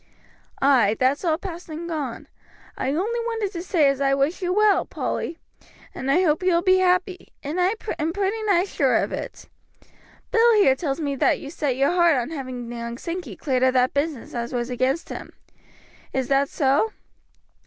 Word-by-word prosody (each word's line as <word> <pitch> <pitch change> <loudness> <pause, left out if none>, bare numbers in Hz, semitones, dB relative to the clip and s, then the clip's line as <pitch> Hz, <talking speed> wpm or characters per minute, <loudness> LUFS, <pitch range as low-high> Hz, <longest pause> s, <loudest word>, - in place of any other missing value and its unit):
"Ay, 240 -7 +4
that's 260 +5 +2
all 320 -3 +1
past 345 -2 -8
and 320 +2 -6
gone. 295 -8 -4 0.5
I - - -3
only 400 +12 -1
wanted 455 -4 -2
to 340 - -5
say 345 -5 +2
as 275 0 0
I 275 0 +3
wish 280 +8 0
you 360 -1 -1
well, 410 -1 +4
Polly, 330 - -4 0.6
and 260 - -4
I 340 +7 +4
hope 310 -1 +2
you 365 -1 +2
will 340 - +1
be 375 0 +4
happy, 365 0 +1 0.2
and 310 +6 -2
I 375 +5 +2 0.2
am 310 +2 0
pretty 400 +4 -1
nigh 360 -3 +4
sure - - +1
of - - +1
it. - - -6 0.8
Bill 465 0 +5
here 400 -11 +5
tells 275 0 -3
me 285 -3 -2
that - - +2
you 280 - -8
set 290 -6 -1
your 275 +3 +3
heart 345 -3 +4
on 250 +5 -2
having 255 -5 -6
young 235 0 -5
Sankey 335 - -5
cleared 260 +1 -1
of 260 0 +4
that 255 +1 +3
business 285 -3 -2
as 235 0 -4
was 240 0 -2
against 260 +6 -1
him. - - -8 0.8
Is 265 -2 -1
that 275 0 +2
so?" 290 +9 +1
310 Hz, 190 wpm, -23 LUFS, 265-365 Hz, 0.8 s, Bill